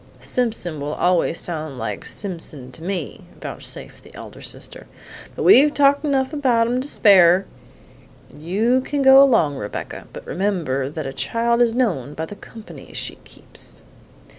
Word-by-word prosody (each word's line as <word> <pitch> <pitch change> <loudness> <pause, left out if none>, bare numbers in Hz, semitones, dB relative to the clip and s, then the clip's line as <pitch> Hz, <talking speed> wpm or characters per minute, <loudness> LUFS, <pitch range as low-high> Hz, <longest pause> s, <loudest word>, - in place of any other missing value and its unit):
"Simpson 220 -10 -2
will 145 +2 -4
always 175 -2 +1
sound 155 -5 -4
like - - -5
Simpson 165 -9 -3
to 160 - -7
me!" 185 +1 -4
vouchsafed - - -8
the - - -16
elder - - -11
sister, - - -6 0.5
"but - - -4
we've 295 -5 +6
talked 285 0 +4
enough 270 -1 0
about 250 -6 +2
em 235 - -1
an' 250 - 0
to 270 - -5
spare. 190 -7 +5 0.9
You 210 - 0
can 285 0 -2
go 265 0 +8
along, 225 - +3
Rebecca; 105 -3 -7
but - - -10
remember 165 -9 -2
that 155 +1 -6
a 135 - -5
child 230 - 0
is 235 -1 +3
known 165 - -1
by 160 - -3
the 205 - -10
company 220 +2 -13
she - - -4
keeps." - - -11
200 Hz, 160 wpm, -21 LUFS, 155-250 Hz, 0.9 s, go